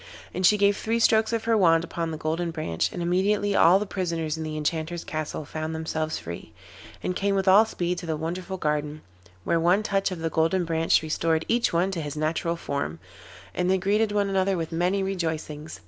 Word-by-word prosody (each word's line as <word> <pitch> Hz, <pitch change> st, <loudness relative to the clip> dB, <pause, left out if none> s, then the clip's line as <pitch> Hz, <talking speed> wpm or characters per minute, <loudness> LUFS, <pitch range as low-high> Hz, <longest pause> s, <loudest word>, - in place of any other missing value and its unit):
And 185 Hz, -, -3 dB
she 210 Hz, -, +4 dB
gave 200 Hz, 0 st, +3 dB
three 225 Hz, +2 st, -1 dB
strokes 220 Hz, -1 st, +3 dB
of 230 Hz, -1 st, -1 dB
her 230 Hz, 0 st, +2 dB
wand 165 Hz, -5 st, +4 dB
upon 165 Hz, -1 st, -3 dB
the 160 Hz, -, -4 dB
Golden 160 Hz, +3 st, -2 dB
Branch, 155 Hz, -, -2 dB
and 175 Hz, -, -4 dB
immediately 200 Hz, +3 st, +1 dB
all 175 Hz, +3 st, +6 dB
the 205 Hz, -, -2 dB
prisoners 170 Hz, -5 st, -2 dB
in 160 Hz, -, -6 dB
the 155 Hz, -1 st, -4 dB
Enchanter's 160 Hz, +2 st, -2 dB
castle 155 Hz, -1 st, -4 dB
found 155 Hz, +2 st, -4 dB
themselves 160 Hz, 0 st, -2 dB
free, 85 Hz, 0 st, -8 dB, 0.5 s
and 180 Hz, -, -2 dB
came 200 Hz, +1 st, 0 dB
with 195 Hz, 0 st, 0 dB
all 200 Hz, +4 st, +7 dB
speed 180 Hz, -4 st, -2 dB
to 175 Hz, -, -8 dB
the 160 Hz, -1 st, -1 dB
wonderful 180 Hz, +4 st, -4 dB
garden, 150 Hz, -1 st, -2 dB, 0.4 s
where 165 Hz, -, +1 dB
one 180 Hz, +5 st, +3 dB
touch 195 Hz, -2 st, 0 dB
of 185 Hz, -, -5 dB
the 165 Hz, 0 st, -3 dB
Golden 165 Hz, +3 st, +1 dB
Branch 165 Hz, -1 st, +2 dB
restored 160 Hz, +1 st, 0 dB
each 235 Hz, 0 st, +2 dB
one 175 Hz, +3 st, +1 dB
to 175 Hz, -4 st, -3 dB
his 150 Hz, 0 st, -5 dB
natural 160 Hz, +2 st, -1 dB
form, 140 Hz, -, -3 dB, 0.6 s
and 180 Hz, 0 st, 0 dB
they 190 Hz, -, +3 dB
greeted 205 Hz, +3 st, +1 dB
one 205 Hz, -1 st, +1 dB
another 195 Hz, -1 st, +1 dB
with 165 Hz, -1 st, -4 dB
many 180 Hz, +4 st, 0 dB
rejoicings. 160 Hz, -, -4 dB
170 Hz, 210 wpm, -25 LUFS, 160-195 Hz, 0.6 s, all